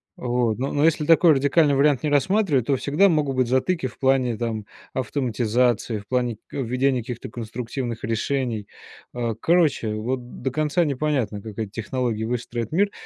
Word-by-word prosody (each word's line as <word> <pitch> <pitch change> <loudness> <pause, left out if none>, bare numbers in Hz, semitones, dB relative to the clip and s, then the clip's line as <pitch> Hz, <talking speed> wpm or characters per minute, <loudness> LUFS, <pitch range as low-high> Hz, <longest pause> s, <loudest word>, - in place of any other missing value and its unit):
Вот, 120 -3 -1
н 135 +2 -2
но 145 - +1
если 160 -1 +2
такой 165 +1 +6
радикальный 145 +2 +3
вариант 140 0 +3
не 150 - +1
рассматривать, 145 - +2
то 140 - +3
всегда 150 +10 +3
могут 150 -5 +1
быть 130 -2 +2
затыки 130 +5 +1
в 125 - -13
плане, 130 -3 +2
там, 110 -3 -3 0.3
автоматизации, 120 -2 0
в 100 - -15
плане 125 -3 0
к - - -23
введения 130 +1 +1
каких-то 120 +1 -7
конструктивных 120 +1 -5
решений, 115 -1 -1 0.5
а. 120 -3 -2
Короче, 150 -7 +2
вот 120 +3 -4
до 130 - -1
конца 155 +5 +1
непонятно, 135 -7 -1
как 105 -1 -9
эти 110 -3 -3
технологии 115 +1 -2
выстроят 120 -1 -3
мир. 200 +4 +2
125 Hz, 165 wpm, -23 LUFS, 115-145 Hz, 0.5 s, такой